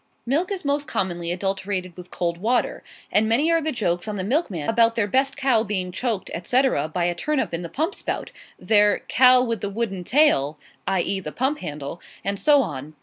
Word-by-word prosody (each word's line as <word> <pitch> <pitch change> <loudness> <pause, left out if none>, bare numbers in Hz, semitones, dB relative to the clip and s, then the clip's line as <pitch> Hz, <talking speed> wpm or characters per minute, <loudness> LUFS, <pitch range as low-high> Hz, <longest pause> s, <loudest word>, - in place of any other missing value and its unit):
Milk 310 +10 0
is 380 -6 -4
most 285 +1 0
commonly 175 -2 -2
adulterated 190 -1 -3
with 180 -1 -11
cold 170 -1 -2
water; 235 +5 0 0.3
and 220 +1 +3
many 285 +9 +3
are 330 0 +3
the 315 +1 -1
jokes 175 - -1
on 210 - -3
the 190 - -3
milkmen 205 - -1
about 230 0 +3
their 225 - +2
best 270 +6 +1
cow 265 -5 +3
being 195 -4 -2
choked 220 0 -3
etc., 245 - +1
by 170 +3 -2
a 175 - +1
turnip 265 - -1
in 170 - -2
the 170 - -6
pump 320 - -1
spout - - -4 0.3
their 210 -1 +3
"cow 255 0 +6
with 230 -4 -2
the 200 - -2
wooden 200 -3 -3
tail" 175 - +3 0.3
(i. 190 -2 +2
e., 195 +2 -1
the 150 -5 -6
pump 265 - -1
handle,) 150 0 -6 0.2
and 200 0 -1
so 290 -3 +5
on. 150 - -7
205 Hz, 205 wpm, -23 LUFS, 175-260 Hz, 0.3 s, cow